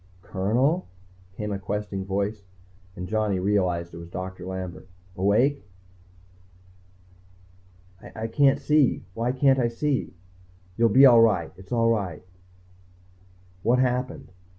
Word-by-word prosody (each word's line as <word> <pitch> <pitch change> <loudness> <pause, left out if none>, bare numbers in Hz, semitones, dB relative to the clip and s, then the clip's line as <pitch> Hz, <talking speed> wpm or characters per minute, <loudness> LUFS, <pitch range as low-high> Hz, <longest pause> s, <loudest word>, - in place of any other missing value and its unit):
"Colonel?" 120 - 0 0.5
came 105 -1 -4
a 100 - -3
questing 100 0 -4
voice, 100 +2 -2 0.5
and 90 -1 -6
Johnny 105 -2 0
realized 90 -3 0
it - - -8
was 85 0 -10
Doctor 90 0 -7
Lambert. 95 -1 -6 0.3
"Awake?" 110 +10 +2 2.5
"I 110 - -4
can't 135 +4 +3
see. 150 -8 +2
Why 115 +4 -1
can't 135 +1 +3
I 120 - +2
see?" 130 +1 -2 0.6
"You'll 115 +2 +3
be 135 +6 +7
all 120 -3 +8
right. 100 -8 +2
It's 95 +1 -16
all 115 -1 +2
right." 95 -8 -2 1.4
"What 120 +5 +2
happened?" 125 0 -1
105 Hz, 120 wpm, -25 LUFS, 95-125 Hz, 2.5 s, all